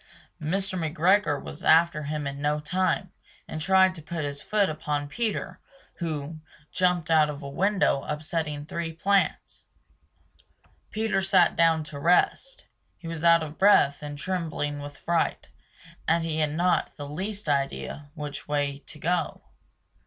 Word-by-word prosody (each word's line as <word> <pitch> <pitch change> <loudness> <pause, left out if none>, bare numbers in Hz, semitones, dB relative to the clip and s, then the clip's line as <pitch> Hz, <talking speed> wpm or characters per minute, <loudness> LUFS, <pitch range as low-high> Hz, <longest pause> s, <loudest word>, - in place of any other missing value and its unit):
Mr. 185 +4 -1
McGregor 165 0 +2
was 155 - -9
after 165 -1 +4
him 150 0 -3
in 140 0 -5
no 150 +1 +1
time, 185 +3 -1 0.4
and 155 - -5
tried 190 +2 +4
to 165 - -10
put 165 0 -4
his 140 0 -5
foot 210 -2 +1
upon 150 -2 -2
Peter, 205 +1 -3 0.4
who 155 -2 -4 0.3
Jumped 180 -3 +1
out 155 -2 +5
of 145 0 -6
a - - -5
window, 190 0 +1
upsetting 150 -1 -3
three 165 +1 -4
plants. 195 +5 0 1.2
Peter 215 -3 0
sat 190 -3 +4
down 165 -1 +3
to 150 -1 -8
rest; 180 - +1 0.3
he 170 - -10
was 165 -1 -5
out 170 -1 +6
of 155 0 -8
breath 170 -8 +5
and 145 -1 -6
trembling 155 -4 -3
with 145 0 -8
fright, 170 -1 -1 0.6
and 165 0 +2
he 160 -1 -2
had 150 -1 +1
not 180 +2 +1
the 145 -1 -6
least 195 +6 -5
idea 145 0 -2
which 150 -2 -6
way 145 -1 -1
to 155 - -9
go. 170 +1 -1
160 Hz, 150 wpm, -26 LUFS, 150-180 Hz, 1.2 s, out